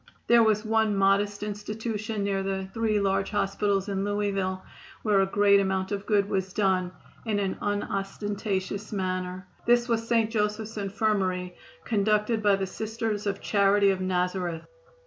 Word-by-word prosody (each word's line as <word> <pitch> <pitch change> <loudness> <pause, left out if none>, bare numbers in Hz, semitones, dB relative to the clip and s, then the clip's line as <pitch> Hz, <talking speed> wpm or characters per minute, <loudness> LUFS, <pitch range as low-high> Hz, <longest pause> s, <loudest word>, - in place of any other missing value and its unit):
There 235 0 +6
was 215 -1 +2
one 220 -1 +2
modest 200 +1 +2
institution 210 0 -4
near 195 -1 0
the 190 0 -3
three 220 -2 +1
large 195 0 +1
hospitals 200 -1 0
in 195 -1 -1
Louisville 195 -2 -1 0.4
where 205 -3 +3
a 195 - +2
great 200 0 +4
amount 190 0 -1
of 200 0 -3
good 205 -2 +2
was 190 -2 -2
done 185 -3 +1 0.3
in 215 -3 -1
an 195 -2 -1
unostentatious 205 0 -3
manner. 185 -2 -3 0.2
This 240 0 +4
was 230 -1 0
St. 230 -2 +2
Joseph's 215 0 -1
Infirmary, 195 -3 -1 0.3
conducted 215 +1 +1
by 205 -2 +4
the 195 0 -2
Sisters 220 +1 -3
of 200 0 -2
Charity 200 -1 +3
of 190 -1 -2
Nazareth. 180 -2 -1
200 Hz, 145 wpm, -27 LUFS, 195-215 Hz, 0.4 s, There